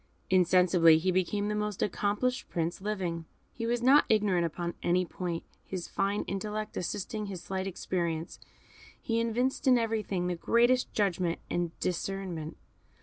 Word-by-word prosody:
Insensibly 180 -2 +5
he 185 +4 +1
became 185 +3 0
the 210 - -1
most 210 -2 -1
accomplished 210 +6 -1
Prince 170 +1 -2
living. 185 -5 -2 0.3
He 230 -1 -4
was 240 0 0
not 275 +4 +6
ignorant 200 -6 +3
upon 170 +1 -4
any 180 +1 +2
point; 170 -1 -4 0.2
his 185 -2 -5
fine 200 +1 0
intellect 210 +2 -4
assisting 210 +3 -3
his 190 -3 -6
slight 190 0 -3
experience, 170 -3 -3 0.6
he 230 -1 0
evinced 245 +4 0
in 255 -1 +7
everything 215 -5 -1
the 180 - 0
greatest 240 +7 +3
judgment 180 -4 0
and 175 -1 -2
discernment. 180 -3 -3
190 Hz, 145 wpm, -30 LUFS, 175-215 Hz, 0.6 s, in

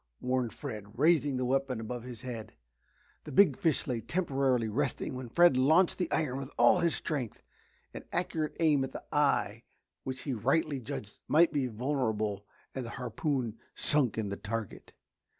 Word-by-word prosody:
warned 125 -2 0
Fred, 105 +1 -8
raising 145 -2 +3
the 125 - -1
weapon 135 -1 0
above 120 +2 -5
his 125 0 -9
head. 120 -4 -6 0.7
The - - -8
big 160 -2 +5
fish 160 0 0
lay 120 -3 -2
temporarily 135 - 0
resting 130 +6 -2
when 130 -1 -6
Fred 175 +2 +5
launched 160 +10 +4
the 180 - -1
iron 135 -4 0
with 135 -1 -6
all 120 +9 +6
his 170 -2 +2
strength. 130 -7 -4 0.5
An - - -8
accurate 165 -3 -2
aim 150 -4 +4
at 130 - -5
the - - -7
eye 140 -7 +2 0.4
which 130 0 -5
he 140 - -3
rightly 135 +5 +1
judged 105 -3 -7
might 165 +2 +5
be 140 -3 +1
vulnerable 110 -5 -1 0.3
and 130 - -4
the 115 - -6
harpoon 125 -1 -2 0.2
sunk 140 -7 +1
in 110 -2 -1
the 100 - -4
target. 110 -1 -5
130 Hz, 170 wpm, -31 LUFS, 115-150 Hz, 0.7 s, all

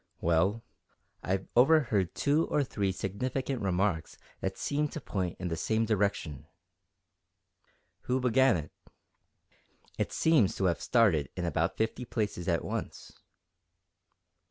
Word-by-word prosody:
"Well, 85 +7 +1 0.6
I've 95 +1 -2
overheard 120 - +3
two 150 +3 +2
or 150 - +1
three 100 -6 -1
significant 125 +8 -3
remarks 95 -3 -1 0.2
that - - -3
seemed 150 +1 -1
to - - -4
point 95 - -3
in 90 -1 -3
the 80 - -2
same 110 +7 0
direction." 100 -9 -1 1.6
"Who 125 +1 +1
began 125 -2 +4
it?" 75 -2 -7 1.3
"It - - -1
seems 155 -12 +3
to 95 - -1
have 85 -2 +1
started 100 - +3
in 90 - -3
about 85 +2 -1
fifty 110 +3 -1
places 105 -7 -3
at 85 -2 0
once." - - -5
100 Hz, 125 wpm, -30 LUFS, 90-125 Hz, 1.6 s, began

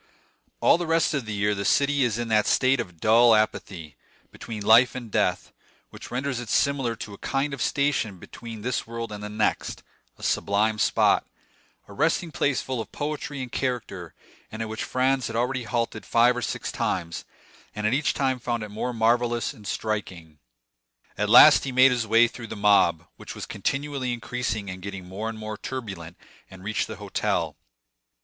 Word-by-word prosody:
All - - +5
the 175 - -3
rest 165 -1 +2
of 135 -6 -2
the 110 - -3
year 105 +1 +1
the 100 -1 -3
city 140 +4 +2
is 120 -3 0
in 120 -1 -3
that 105 -1 +3
state 130 0 +3
of 90 -3 -6
dull 115 +4 +6
apathy, 90 -7 -2 0.3
between 110 -3 -7
life 120 +3 +6
and 120 -4 -7
death, 90 -4 0 0.4
which - - -10
renders 130 +1 -2
it 120 -3 -7
similar 135 -3 +1
to 105 -1 -8
a 100 - -12
kind 140 +1 -1
of 135 - -5
station 140 -7 0
between 115 +3 -10
this 125 -1 -2
world 115 -1 -5
and 105 0 -7
the 105 - -5
next—a 105 - -4
sublime 105 +2 +1
spot, - - +3 0.6
a 100 - -12
resting 160 - 0
place 145 -3 0
full 130 -3 -3
of 110 - -10
poetry 145 -2 -4
and 125 - -8
character, 115 -10 -4 0.4
and 110 +1 -4
at 110 - -6
which 110 - -4
Franz 130 0 +1
had 115 - -6
already 125 +1 -1
halted 115 -1 -2
five 120 +1 +3
or 125 - -3
six - - -3
times, 85 -3 -2 0.5
and 105 0 -3
at 110 - +2
each 145 +3 +1
time 130 -2 0
found 120 -2 -2
it 105 - -7
more 115 +4 -3
marvellous 120 +2 +1
and 105 -6 -12
striking. 90 -8 -4 0.8
At - - -1
last - - +9
he 135 - -3
made 130 +1 +6
his 120 -3 -1
way 115 +2 +5
through 120 -1 -9
the - - -7
mob, 100 -6 +3
which - - -9
was - - -6
continually 135 -3 -2
increasing 120 -3 -3
and 95 -1 -7
getting 100 -1 -7
more 105 +5 -4
and 110 - -7
more 110 -1 -6
turbulent, 95 -10 -7 0.3
and 95 -1 -13
reached 110 +2 -1
the 110 - -7
hotel. 100 0 -2
115 Hz, 185 wpm, -25 LUFS, 105-130 Hz, 0.8 s, last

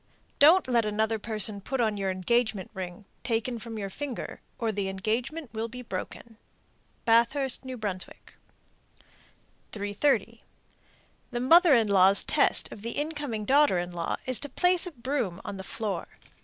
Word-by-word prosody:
Don't 325 +5 +7
let 240 -2 +3
another 215 +1 0
person 215 -2 -2
put 265 +6 -3
on 220 -3 +2
your 195 -1 -1
engagement 205 +1 0
ring, 185 +1 -7 0.2
taken 235 0 -1
from 225 0 -7
your 200 -2 -4
finger, 275 +1 -6 0.2
or 230 -2 -1
the 200 -2 -2
engagement 235 +9 -3
will 220 +1 -2
be 250 +2 -9
broken. 225 +2 -7 0.7
Bathurst, 240 +4 +3
N.B. 260 -2 -7 1.9
330. 205 +7 0 0.9
The 240 - -3
mother 330 +4 +6
in 225 -3 +3
law's 195 0 +5
test - - +1
of 205 - -9
the 230 +2 -4
incoming 290 -8 -3
daughter 280 -5 +4
in 175 0 -3
law 170 -1 -2
is 255 -2 +1
to 290 - -4
place 360 +5 +3
a - - -6
broom 240 - -2
on 200 - -5
the 190 - -7
floor. 200 -2 -3
230 Hz, 150 wpm, -28 LUFS, 200-260 Hz, 1.9 s, Don't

